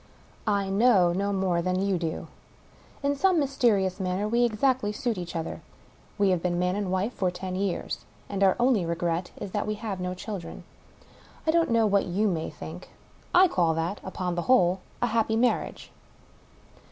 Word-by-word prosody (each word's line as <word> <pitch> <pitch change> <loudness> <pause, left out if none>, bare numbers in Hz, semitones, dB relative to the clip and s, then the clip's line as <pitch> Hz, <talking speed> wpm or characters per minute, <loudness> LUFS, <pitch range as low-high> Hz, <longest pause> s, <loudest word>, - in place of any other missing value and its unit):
I 200 -2 +1
know 195 -3 +4
no 200 +3 0
more 190 -3 +1
than 185 +1 0
you 195 -2 +1
do. 165 -2 -3 0.8
In 280 - +2
son^ 365 +5 +2
mysterious 230 - +2
manner 190 +2 -1
we 240 +2 +3
exactl; 225 -1 +1
suit 240 0 -1
each 175 -2 -6
other. 165 -1 -4 0.6
We 200 -2 +3
have 180 -2 +1
been 175 0 0
man 180 +1 +1
and 200 -3 -2
wife 190 +6 0
for 185 - 0
ten 185 +1 -5
years, 190 -1 -2 0.2
and 200 -1 -4
our 190 - +5
only, 240 -5 +3
regret 170 +1 -1
is, 195 - -6
that 205 - -2
we 215 - -1
have 210 -3 -5
no 180 0 -3
children. 185 -3 -7 0.8
I 315 - +3
don't 335 0 +2
know 230 -1 +3
what 200 -1 +2
you 195 +4 +1
may 165 -5 -1
think; - - -9 0.3
/ 365 +1 +4
call 165 -3 +2
that 165 +5 -2
— - - -26
upon 185 -1 -3
the 175 - -1
whole 190 -7 +4
— - - -29
^a - - +3
happy 225 -1 +1
mar 240 +2 +3
riage. - - -10
195 Hz, 190 wpm, -27 LUFS, 180-225 Hz, 0.8 s, our